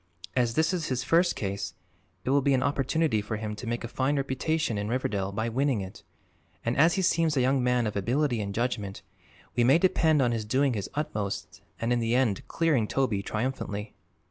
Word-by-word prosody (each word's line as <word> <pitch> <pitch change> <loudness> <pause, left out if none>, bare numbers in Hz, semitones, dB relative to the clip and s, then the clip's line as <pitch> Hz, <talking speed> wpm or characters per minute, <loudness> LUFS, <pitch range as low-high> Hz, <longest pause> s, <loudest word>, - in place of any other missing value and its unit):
"As 120 -2 +1
this 160 +3 +2
is 170 -4 -1
his 130 -1 -1
first 170 +6 +3
case, 100 -2 -4 0.5
it 130 - +1
will 140 +1 +4
be 140 0 +3
an 130 - +1
opportunity 140 -3 +1
for 105 +1 -4
him 105 0 -4
to 115 +3 -8
make 120 +1 -2
a - - -3
fine 135 +4 0
reputation 135 -2 -1
in 105 - -2
Riverdale 105 -6 -1
by 110 +3 -2
winning 130 -1 +1
it, 95 0 -8 0.6
and 115 +2 0
as 165 +4 +4
he 190 - 0
seems 165 -4 +2
a - - +4
young 130 +1 +2
man 125 -1 +2
of 105 - -3
ability 120 +4 +1
and 100 -1 -3
judgment 105 -3 -2 0.5
we 120 - +3
may 130 +6 +6
depend 165 -4 +3
on 125 -3 +3
his 115 -2 -1
doing 130 +5 +1
his 100 -3 -3
utmost 105 -9 -3 0.2
and 115 +1 +1
in 120 - +1
the 115 +1 +1
end 125 -1 +1
clearing 150 -10 +1
Toby 120 -7 0
triumphantly." 110 -2 -3
125 Hz, 205 wpm, -28 LUFS, 110-140 Hz, 0.6 s, may